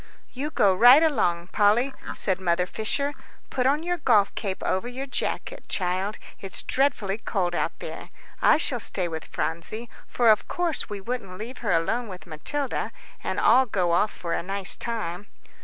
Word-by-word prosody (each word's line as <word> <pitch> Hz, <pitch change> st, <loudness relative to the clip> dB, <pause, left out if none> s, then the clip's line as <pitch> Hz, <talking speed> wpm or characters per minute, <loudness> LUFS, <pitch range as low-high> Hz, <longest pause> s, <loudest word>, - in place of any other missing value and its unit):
"You 280 Hz, +4 st, -4 dB
go 200 Hz, -10 st, +3 dB
right 245 Hz, -, +8 dB
along, 175 Hz, -, +1 dB
Polly," 220 Hz, +6 st, +3 dB, 0.2 s
said 190 Hz, -2 st, 0 dB
Mother 180 Hz, 0 st, +2 dB
Fisher. 280 Hz, +9 st, -1 dB, 0.4 s
"Put 255 Hz, -1 st, +1 dB
on 295 Hz, +4 st, +2 dB
your 355 Hz, 0 st, -1 dB
golf 215 Hz, -8 st, +3 dB
cape 195 Hz, -3 st, -4 dB
over 190 Hz, +5 st, 0 dB
your 255 Hz, +2 st, -5 dB
jacket, -, -, -3 dB
child, 185 Hz, +3 st, -1 dB, 0.2 s
it's 195 Hz, -, -3 dB
dreadfully 225 Hz, -7 st, 0 dB
cold 185 Hz, -4 st, -1 dB
out -, -, -1 dB
there. -, -, -8 dB, 0.3 s
I -, -, +6 dB
shall 260 Hz, -5 st, 0 dB
stay 185 Hz, -4 st, +1 dB
with 160 Hz, -1 st, -6 dB
Phronsie, 195 Hz, +8 st, -3 dB, 0.2 s
for 240 Hz, -2 st, +3 dB
of 215 Hz, -, +2 dB
course 345 Hz, -7 st, -1 dB
we 205 Hz, -1 st, -5 dB
wouldn't 195 Hz, -4 st, -5 dB
leave 235 Hz, +5 st, -7 dB
her 215 Hz, -4 st, -1 dB
alone 200 Hz, +9 st, +1 dB
with 185 Hz, -3 st, -9 dB
Matilda, 255 Hz, -, -3 dB, 0.3 s
and -, -, -2 dB
all 260 Hz, 0 st, +5 dB
go 185 Hz, -5 st, 0 dB
off 205 Hz, +5 st, +2 dB
for 170 Hz, -1 st, -4 dB
a -, -, 0 dB
nice 195 Hz, +1 st, -2 dB
time." 205 Hz, -5 st, -4 dB
210 Hz, 175 wpm, -25 LUFS, 185-255 Hz, 0.4 s, right